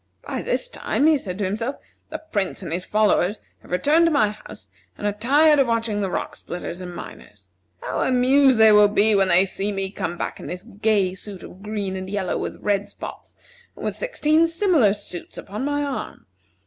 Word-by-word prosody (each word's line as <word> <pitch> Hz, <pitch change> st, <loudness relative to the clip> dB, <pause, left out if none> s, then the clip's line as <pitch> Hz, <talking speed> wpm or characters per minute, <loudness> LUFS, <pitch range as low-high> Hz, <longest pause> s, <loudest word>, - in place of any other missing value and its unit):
"By -, -, -3 dB
this -, -, -1 dB
time," 300 Hz, -, -1 dB
he 315 Hz, 0 st, +6 dB
said 185 Hz, -6 st, -6 dB
to 205 Hz, -, -1 dB
himself, 225 Hz, +8 st, -2 dB, 0.3 s
"the -, -, -4 dB
Prince 200 Hz, -2 st, -2 dB
and 170 Hz, -, -5 dB
his 180 Hz, +1 st, -2 dB
followers 210 Hz, -1 st, +2 dB, 0.2 s
have -, -, -18 dB
returned 295 Hz, -, +3 dB
to -, -, +2 dB
my 245 Hz, -9 st, +3 dB
house, 210 Hz, -, -12 dB, 0.3 s
and -, -, -6 dB
are 205 Hz, -, +1 dB
tired 290 Hz, +8 st, +4 dB
of 270 Hz, -, +4 dB
watching 225 Hz, -3 st, 0 dB
the 195 Hz, -, -1 dB
rock -, -, -3 dB
splitters 175 Hz, 0 st, -7 dB
and 180 Hz, -1 st, -7 dB
miners. 100 Hz, -, -11 dB, 0.3 s
How -, -, -3 dB
amused 260 Hz, +1 st, +4 dB
they 220 Hz, -1 st, +7 dB
will 210 Hz, 0 st, +7 dB
be 210 Hz, +1 st, +3 dB
when 195 Hz, -1 st, +3 dB
they 185 Hz, +1 st, +5 dB
see 195 Hz, +2 st, -2 dB
me 195 Hz, -1 st, -3 dB
come 175 Hz, -3 st, -4 dB
back -, -, -4 dB
in -, -, -8 dB
this 180 Hz, +1 st, -6 dB
gay 205 Hz, -3 st, 0 dB
suit 190 Hz, -1 st, -8 dB
of 185 Hz, -, -12 dB
green 205 Hz, -2 st, -3 dB
and 185 Hz, 0 st, -5 dB
yellow, 195 Hz, -2 st, -2 dB
with -, -, -5 dB
red 205 Hz, -1 st, 0 dB
spots, -, -, -10 dB, 0.4 s
and -, -, -8 dB
with -, -, -2 dB
sixteen 330 Hz, -10 st, +2 dB
similar 330 Hz, -, +3 dB
suits 180 Hz, -4 st, -8 dB
upon 210 Hz, +7 st, -5 dB
my 290 Hz, 0 st, 0 dB
arm! 280 Hz, -2 st, -5 dB
210 Hz, 205 wpm, -23 LUFS, 190-265 Hz, 0.4 s, they